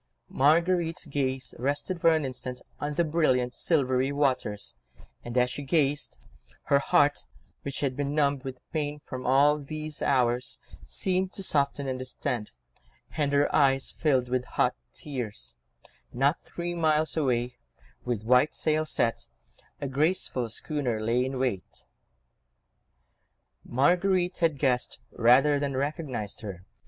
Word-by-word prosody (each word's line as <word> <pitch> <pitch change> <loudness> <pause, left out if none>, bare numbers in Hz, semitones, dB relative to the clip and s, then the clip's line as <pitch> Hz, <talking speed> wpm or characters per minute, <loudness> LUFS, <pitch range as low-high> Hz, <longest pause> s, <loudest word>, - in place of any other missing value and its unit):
Marguerite's 165 +4 +2
gaze 130 -3 -2
rested 145 +7 -2
for 165 - +6
an 155 -2 0
instant 125 -1 -6 0.2
on 145 0 -3
the 170 - +3
brilliant, 130 -6 +1
silvery 130 -4 +1
waters; 130 -8 -1 0.5
and 120 +1 -5
as 125 0 +3
she 145 - -5
gazed, 145 0 0 0.5
her 140 - +3
heart, 145 +1 +3 0.4
which 140 -1 -5
had 135 -3 0
been 145 +1 -2
numb 140 -2 +2
with 130 -2 -8
pain 150 -2 -2
for 130 -1 -6
all 140 +4 +4
these 155 +1 -6
hours, 125 -2 +1 0.3
seemed 185 0 0
to 195 - -5
soften 140 -4 +1
and 130 -1 -2
distend, 125 -3 -3 0.7
and 145 -2 0
her 145 0 +2
eyes 135 -2 +3
filled 130 -5 +1
with 125 0 0
hot 125 - +1 0.2
tears: 110 - -5 0.6
not 140 +5 +1
three 175 0 -5
miles 155 -2 +1
away, 125 -5 0 0.4
with 120 -4 -2
white 125 +5 +3
sails 155 0 0
set, 115 -5 0 0.5
a 140 - -3
graceful 135 -4 0
schooner 125 -2 -2
lay 115 +3 +1
in 130 +1 -3
wait. 125 -8 -3 1.8
Marguerite 180 +7 +2
had 165 -4 +2
guessed 125 -3 0
rather 135 +5 +4
than 140 -2 -2
recognised 140 - -3
her. 95 -4 -8
140 Hz, 135 wpm, -28 LUFS, 125-150 Hz, 1.8 s, for